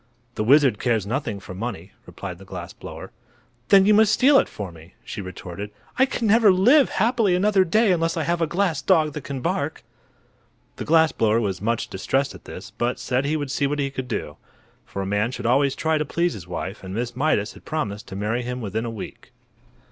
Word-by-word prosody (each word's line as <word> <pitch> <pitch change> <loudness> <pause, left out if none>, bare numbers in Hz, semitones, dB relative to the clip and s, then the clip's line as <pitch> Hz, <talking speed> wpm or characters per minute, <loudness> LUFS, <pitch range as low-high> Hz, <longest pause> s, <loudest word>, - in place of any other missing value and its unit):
"The 110 - -2
wizard 135 -2 +4
cares 115 -5 +1
nothing 115 -2 -3
for 95 - -10
money," 95 -3 -6 0.2
replied 90 -3 -7
the - - -12
glass 90 -3 -8
blower. - - -9 0.6
"Then 195 -1 +7
you 210 - +5
must 215 0 +5
steal 275 +4 +5
it - - -1
for 100 -4 -6
me," 80 +2 -16
she - - -6
retorted. 90 +1 -7 0.3
"I 265 - +5
can 245 - -3
never 215 -1 +6
live 250 +11 +5
happily 225 -3 +2
another 195 +1 +3
day 215 +4 +3
unless 165 -1 +1
I 160 - 0
have 170 +1 -1
a 165 - +2
glass 175 0 0
dog 155 -6 +3
that 150 - -6
can 135 -2 -5
bark." - - -2 0.9
The - - -5
glass 160 0 +4
blower 110 0 +2
was 95 -5 -2
much 115 +2 -1
distressed 135 +8 -1
at - - -14
this, - - -9
but 120 +1 0
said 130 +2 -1
he 155 +2 0
would 145 -3 -4
see 140 0 +1
what 145 +1 -2
he 140 -1 -1
could 130 -2 -5
do. - - -4 0.5
For 100 - -4
a - - -4
man 105 +3 0
should 125 - -6
always 135 +3 +3
try 160 -1 0
to - - +1
please 170 +3 0
his 90 -4 -9
wife, 95 +3 -5
and 95 +1 -6
Miss 120 +1 -3
Mydas 125 -6 +1
has - - -14
promised 105 -10 -4
to 95 - -8
marry 105 +5 -1
him 125 +1 -4
within 110 0 -3
a - - -3
week. 115 -3 -9
130 Hz, 220 wpm, -23 LUFS, 105-165 Hz, 0.9 s, Then